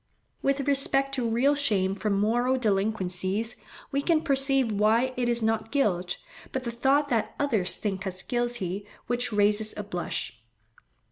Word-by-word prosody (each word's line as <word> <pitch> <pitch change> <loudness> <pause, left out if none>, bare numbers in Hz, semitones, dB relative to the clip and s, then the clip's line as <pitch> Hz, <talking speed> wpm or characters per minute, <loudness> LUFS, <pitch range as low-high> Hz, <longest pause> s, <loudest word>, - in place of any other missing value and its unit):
With 275 0 0
respect 275 -1 +3
to 250 -4 -1
real 250 +6 +3
shame 205 -10 +1
from 200 0 -1
moral 240 +5 +2
delinquencies, 200 -1 0 0.4
we 280 - 0
can 320 +1 +2
perceive 270 -4 +2
why 220 +5 +2
it 245 -1 0
is 235 -1 +2
not 225 0 0
guilt, 185 -10 0 0.3
but 265 - -3
the 235 - -3
thought 275 +5 +2
that 230 -3 -1
others 220 -11 +1
think 195 -2 -3
us 185 0 -4
guilty, 225 -6 -2 0.2
which 245 +1 0
raises 210 +1 +2
a 210 - -3
blush. 175 - -5
230 Hz, 150 wpm, -27 LUFS, 205-265 Hz, 0.4 s, respect